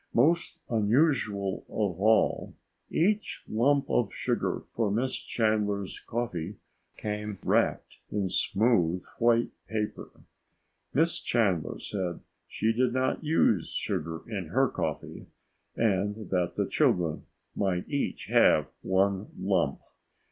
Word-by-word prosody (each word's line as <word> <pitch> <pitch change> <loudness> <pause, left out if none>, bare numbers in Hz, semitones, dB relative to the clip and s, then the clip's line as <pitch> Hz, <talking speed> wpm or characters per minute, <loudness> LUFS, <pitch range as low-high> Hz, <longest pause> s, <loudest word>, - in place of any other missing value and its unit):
Most 165 +8 +3
unusual 110 -4 +1
of 95 -4 -2
all, 110 +1 +3 0.3
each 205 +5 0
lump 135 +5 +2
of 115 -5 +1
sugar - - -1
for 115 -3 0
Miss 120 +6 0
Chandler's 105 -3 -1
coffee 105 -6 -3 0.4
came 105 -1 -4
wrapped - - +1
in 100 -2 -1
smooth 90 -3 +2
white 120 0 +3 0.2
paper. 105 -1 -3 0.8
Miss 160 +3 +2
Chandler 100 -9 0
said 90 -4 -3 0.3
she 110 +1 0
did 125 +1 +1
not 130 +5 0
use 130 - +2
sugar 80 +1 -3
in 100 -7 -4
her - - +2
coffee - - -4 0.5
and 105 -1 0
that 90 -2 +1
the - - +1
children 85 -3 +1 0.3
might 95 -3 0
each 140 -1 -2
have - - +4
one 95 +1 +1
lump. 90 -8 +1
105 Hz, 110 wpm, -28 LUFS, 95-120 Hz, 0.8 s, have